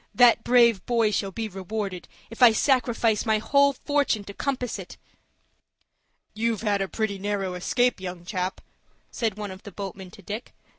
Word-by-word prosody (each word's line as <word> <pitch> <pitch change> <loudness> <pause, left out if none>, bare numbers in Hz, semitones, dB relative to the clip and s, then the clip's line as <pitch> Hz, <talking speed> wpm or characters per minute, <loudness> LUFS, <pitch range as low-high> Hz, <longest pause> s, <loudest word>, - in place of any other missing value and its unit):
"That 240 -2 +6
brave 235 -5 +4
boy 230 -3 +2
shall 200 -1 -1
be 220 +3 -4
rewarded, 195 -1 -5 0.2
if 230 - -10
I 240 -2 +8
sacrifice 230 -3 +2
my 220 -2 +2
whole 280 +5 +3
fortune 285 -6 0
to 200 - -9
compass 250 0 -3
it." - - -10 1.4
"You've 225 -1 -1
had 205 -2 +1
a 195 - -1
pretty 210 -1 -2
narrow 195 -2 -2
escape, 245 +7 +1
young 180 -2 -6
chap," 185 -1 -3 0.5
said 220 -4 -2
one 205 -2 -5
of 190 +1 -10
the 205 - -10
boatmen 195 -1 -7
to 200 - -15
Dick. 210 +6 -7
215 Hz, 165 wpm, -25 LUFS, 195-235 Hz, 1.4 s, I